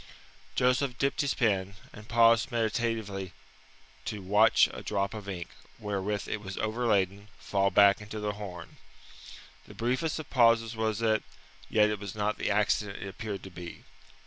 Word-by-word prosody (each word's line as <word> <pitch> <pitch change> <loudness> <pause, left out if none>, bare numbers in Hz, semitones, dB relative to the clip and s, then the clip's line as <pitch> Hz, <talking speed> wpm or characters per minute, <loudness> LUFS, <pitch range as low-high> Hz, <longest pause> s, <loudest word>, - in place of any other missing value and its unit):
Joseph 125 +1 +2
dipped 140 0 +1
his 140 -2 0
pen, 100 -4 +1 0.2
and 105 +1 -12
paused 115 +2 +4
meditatively 110 -4 -2 0.7
to 105 -3 -4
watch 105 +4 +5
a - - -7
drop 100 -1 -1
of 105 -2 -7
ink, 85 -3 -5 0.3
wherewith 105 0 -3
it 105 - -3
was 95 -2 -7
overladen, 105 -3 0
fall 100 -1 +1
back 100 0 +5
into 105 +1 -7
the 105 0 -1
horn. 95 -5 -9 0.9
The - - -12
briefest 130 +7 -1
of 155 - -8
pauses 115 -2 +4
was 110 0 -1
it, 110 -1 +3 0.5
yet 105 -1 +4
it 105 - -3
was 100 -1 -7
not 105 0 -1
the - - -1
accident 105 0 +1
it - - -5
appeared 105 0 -6
to 95 - -9
be. 85 -1 -9
105 Hz, 160 wpm, -29 LUFS, 100-115 Hz, 0.9 s, watch